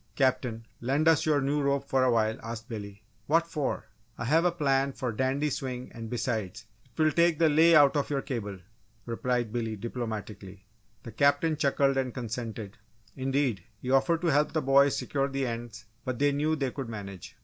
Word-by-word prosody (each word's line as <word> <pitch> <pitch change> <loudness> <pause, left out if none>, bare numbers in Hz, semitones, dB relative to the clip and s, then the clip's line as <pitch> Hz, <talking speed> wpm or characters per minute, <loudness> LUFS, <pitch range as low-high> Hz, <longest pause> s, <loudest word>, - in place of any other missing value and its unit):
"Captain, 130 -4 0
lend 140 +6 +1
us 160 -1 +4
your 150 -2 +3
new 145 +2 0
rope 140 0 0
for 130 -1 +2
a 130 - +4
while?" 110 -2 +2
asked 115 0 -7
Billy. 100 -4 -8 0.2
"What 165 +3 +3
for?" 155 -4 -3 0.3
"I 115 - -4
have 160 +7 +3
a 180 - +4
plan 140 -4 +1
for 130 - -3
a 115 - -5
dandy 135 +4 0
swing 125 -1 -4
and 115 -1 -7
besides, 110 -5 -3 0.2
it 130 +4 -21
will 155 0 +4
take 170 -1 +3
the 160 0 +4
'lay' 160 +3 +6
out 145 -1 +6
of 145 - 0
your 140 -2 -1
cable," 110 -8 -4 0.5
replied 120 -1 -1
Billy, 115 -2 -2
diplomatically. 105 -4 -6 0.4
The 115 - -8
Captain 145 +6 +2
chuckled 140 -1 +2
and 130 -2 -1
consented 115 -4 -5 0.4
indeed, 135 -7 0 0.2
he 125 - -4
offered 165 +5 +3
to 175 - +1
help 145 +2 +2
the 155 - +1
boys 140 +1 +4
secure 135 -1 -1
the 135 -1 -2
ends 115 -2 -6 0.2
but 130 -2 -3
they 145 +2 +3
knew 150 +3 +1
they 135 -4 -2
could 135 -3 -6
manage. 100 -4 -8
130 Hz, 195 wpm, -28 LUFS, 115-145 Hz, 0.5 s, lay